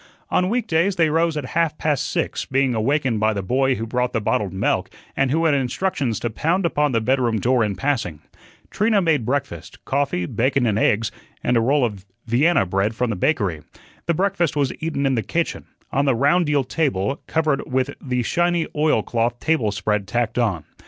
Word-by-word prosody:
On 180 0 +2
weekdays 195 -5 +1
they 165 -4 +2
rose 165 0 +1
at 145 - -3
half 165 -2 +1
past 150 -3 0
six, - - -2
being 135 -1 +1
awakened 125 +1 0
by 110 +1 +2
the 100 -2 -3
boy 130 +5 +1
who 115 - -4
brought 125 +2 -1
the 115 - +1
bottled 105 -2 -1
milk, 95 - 0 0.3
and 135 -1 +1
who 160 +5 +1
had 155 - +4
instructions 135 - -1
to 120 - -2
pound 170 - 0
upon 150 -3 +1
the 115 - +2
bedroom 120 -1 +1
door 120 +2 +2
in 105 -2 -1
passing. 120 - -2 0.5
Trina 210 0 +2
made 160 - +1
breakfast 130 - -4
coffee, 135 -10 0
bacon 130 +6 +1
and 110 -2 +1
eggs, 110 0 +2 0.3
and 125 - +1
a 115 - +4
roll 135 +3 +3
of 100 -4 -6 0.2
Vienna 135 - +3
bread 95 +4 0
from 125 0 0
the - - -2
bakery. 90 - 0 0.5
The 170 - +2
breakfast 185 -2 0
was 140 -3 0
eaten 155 -3 -2
in 135 - +2
the 115 - +1
kitchen, 170 +8 -2 0.2
on 140 +1 +1
the 135 -3 +3
round 145 +7 +3
deal 145 -2 +2
table 135 - -1
covered 155 -5 0
with 130 +2 0
the 125 -2 -1
shiny 175 +5 +1
oilcloth 120 -5 +1
table 155 -10 +1
spread 100 +1 -1
tacked 120 +3 -1
on. 100 -10 0
130 Hz, 195 wpm, -22 LUFS, 115-155 Hz, 0.5 s, had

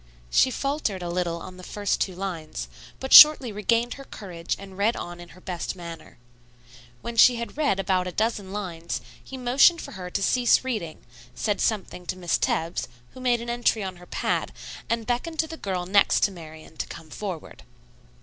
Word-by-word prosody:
She - - +5
faltered 265 -9 -2
a 175 - -4
little 175 -1 -1
on 185 0 -10
the - - -10
first 205 +2 -2
two 185 - -1
lines, 165 - -5 0.3
but 265 - -2
shortly 300 -6 +10
regained 230 +4 +1
her 275 - -10
courage 180 -9 -5
and 195 -1 -11
read 205 +4 +1
on 175 0 -7
in 175 -1 -11
her 185 - -15
best 180 -1 -4
manner. 170 -2 -10 0.9
When 235 - -5
she 245 +2 +7
had 235 0 -5
read 285 -10 +1
about 185 -1 +1
a - - -3
dozen 215 -2 -1
lines 175 -5 -4 0.2
he 265 - -8
motioned 260 +7 +5
for - - -8
her 180 -2 -7
to 195 +2 -2
cease 245 +3 +3
reading, 215 -12 -4 0.3
said 205 -3 -1
something 190 -4 -2
to 185 - -3
Miss 175 -2 0
Tebbs, 165 +1 -1 0.3
who - - -11
made 245 -2 +2
an 235 - -6
entry 240 -3 +1
on 185 -2 -5
her 180 0 -15
pad, - - -1 0.4
and 230 -1 -1
beckoned 250 +8 -2
to 320 - +1
the 320 - -7
girl 185 - -3
next 200 +2 +4
to 205 - +3
Marian 160 -2 -12
to - - -3
come 160 -1 -11
forward. 185 -5 -6
195 Hz, 195 wpm, -25 LUFS, 175-240 Hz, 0.9 s, shortly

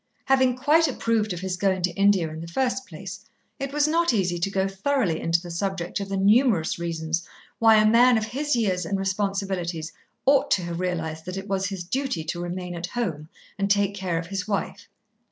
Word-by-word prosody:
Having 260 -2 +3
quite 310 +5 +4
approved 230 -5 0
of 175 -1 -4
his 190 -1 -2
going 190 -1 +1
to 180 - +2
India 195 -2 +3
in 160 - -7
the 165 - -7
first 260 +7 -1
place, 195 +3 -8 0.4
it 275 0 -3
was 295 +1 +2
not 335 -1 +2
easy 180 -4 0
to 175 - 0
go 195 0 0
thoroughly 195 - 0
into 165 0 +2
the 175 0 -9
subject 180 0 -2
of 200 -1 -5
the 195 - -1
numerous 205 -4 +3
reasons 165 -1 -2 0.4
why 225 -1 +6
a 215 0 +5
man 235 +2 +6
of 220 - -1
his 285 +5 -1
years 190 -6 0
and 195 +4 -1
responsibilities 190 -4 -2 0.3
ought 275 0 +4
to 185 - +2
have 170 0 -4
realised 160 -3 -3
that 185 +1 -5
it 195 +1 -6
was 195 -1 0
his 190 -2 -5
duty 260 - -2
to 175 +2 -4
remain 175 0 -4
at 170 0 -4
home 165 -10 -3 0.3
and 200 0 0
take 200 0 +2
care 185 -4 -2
of 165 - -3
his 190 +2 -4
wife. 200 -1 -3
195 Hz, 210 wpm, -25 LUFS, 175-225 Hz, 0.4 s, why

